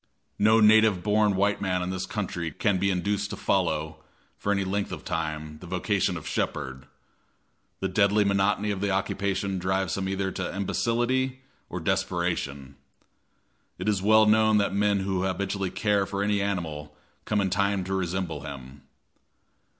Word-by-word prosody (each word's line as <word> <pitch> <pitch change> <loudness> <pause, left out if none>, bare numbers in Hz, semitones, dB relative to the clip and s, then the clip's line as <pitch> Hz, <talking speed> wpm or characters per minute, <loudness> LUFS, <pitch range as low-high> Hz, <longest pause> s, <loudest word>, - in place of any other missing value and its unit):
No 110 +2 +5
native 110 -3 +5
born 105 -1 +3
white 100 +1 +1
man 90 -2 0
in 90 - -3
this 95 0 -3
country 90 -5 -3
can 100 +2 0
be 100 +1 +2
induced 100 +2 -1
to 105 - -4
follow, 80 -6 0 0.4
for 100 - -2
any 100 -1 +1
length 100 +1 -2
of - - -7
time, 75 -3 -4
the 90 - -11
vocation 95 0 0
of 80 - -8
shepherd. 65 -1 -3 0.9
The 95 - +1
deadly 100 +2 +3
monotony 100 +1 +1
of 95 -2 -3
the 100 - 0
occupation 95 0 -1
drives 95 +1 0
him 95 -1 -2
either 95 0 -1
to 95 0 -4
imbecility 120 +6 0 0.3
or - - -4
desperation. 70 -1 -2 1.0
It - - -5
is 105 -3 +1
well 110 +2 +5
known 110 0 +4
that 100 -2 +1
men 100 0 +2
who 95 -1 -1
habitually 95 +1 -1
care 100 0 +1
for 100 0 -2
any 105 -1 +1
animal 80 -7 -3 0.3
come 105 - +1
in 95 -2 0
time 100 0 +1
to 95 +1 -4
resemble 90 -4 -2
him. 70 -2 -9
95 Hz, 160 wpm, -26 LUFS, 90-105 Hz, 1.0 s, No